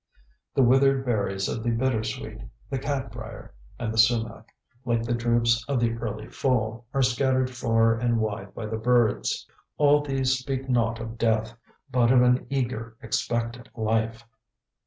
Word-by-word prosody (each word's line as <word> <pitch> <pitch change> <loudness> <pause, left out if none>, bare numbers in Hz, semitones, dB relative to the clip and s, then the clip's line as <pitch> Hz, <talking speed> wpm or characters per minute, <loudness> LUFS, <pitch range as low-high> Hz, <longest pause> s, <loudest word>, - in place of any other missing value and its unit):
The 135 - +5
withered 135 +2 +4
berries 100 -5 0
of 115 - -3
the 120 - -1
bittersweet, 115 -2 -2 0.3
the 135 - -1
cat 135 -3 -3
brier, 115 -2 -9 0.2
and 115 -2 -3
the 110 - 0
sumac, 115 0 +2 0.4
like 120 -2 0
the 120 +1 -1
drupes 115 -1 +2
of 140 -3 0
the 120 -1 +2
early 110 -2 -5
fall, 115 -3 -1
are 135 -1 +1
scattered 130 +1 +1
far 115 -2 +2
and 120 0 0
wide 110 0 -3
by 115 - -5
the 110 +1 -3
birds. 120 - +1 0.3
All 145 0 +5
these 135 -2 0
speak 135 0 -4
not 115 -3 +1
of 115 0 -7
death, 110 0 +1 0.4
but 120 -1 +3
of 125 -1 +6
an 125 0 +2
eager, 120 -4 -3
expectant 115 +3 -2
life. 115 +1 -1
120 Hz, 155 wpm, -26 LUFS, 115-130 Hz, 0.4 s, of